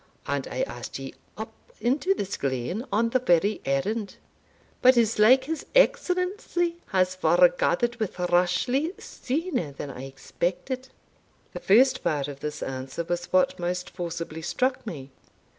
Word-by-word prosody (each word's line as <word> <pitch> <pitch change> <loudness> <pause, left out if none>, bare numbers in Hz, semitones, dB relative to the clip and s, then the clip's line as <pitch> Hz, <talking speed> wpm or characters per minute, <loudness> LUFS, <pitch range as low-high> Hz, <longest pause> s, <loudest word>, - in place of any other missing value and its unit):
And - - -2
I - - -2
asked - - -6
ye - - -7 0.2
up - - -6 0.3
into 290 +11 +1
this 200 - -3
glen 135 - -2
on 230 +2 +2
the 255 - +3
very 205 -3 +2
errand. 195 +10 -1 0.7
But 255 0 +6
it's 225 -2 +2
like 255 +5 +7
his 315 +3 -4
Excellency 365 -7 +2
has 185 -1 +2
foregathered 250 - +3
wi' 185 -4 -2
Rashleigh 245 - +1
sooner 310 - -3
than 140 0 -6
I 130 0 -8
expected." 185 - -4 0.6
The - - -5
first 260 +6 +4
part 145 -3 0
of 140 -1 -8
this 150 0 -4
answer 135 +5 -4
was 175 +1 -2
what 185 0 +2
most 180 0 -3
forcibly 170 -2 -5
struck 255 +8 -1
me. 140 -8 -7
210 Hz, 140 wpm, -26 LUFS, 170-265 Hz, 0.7 s, like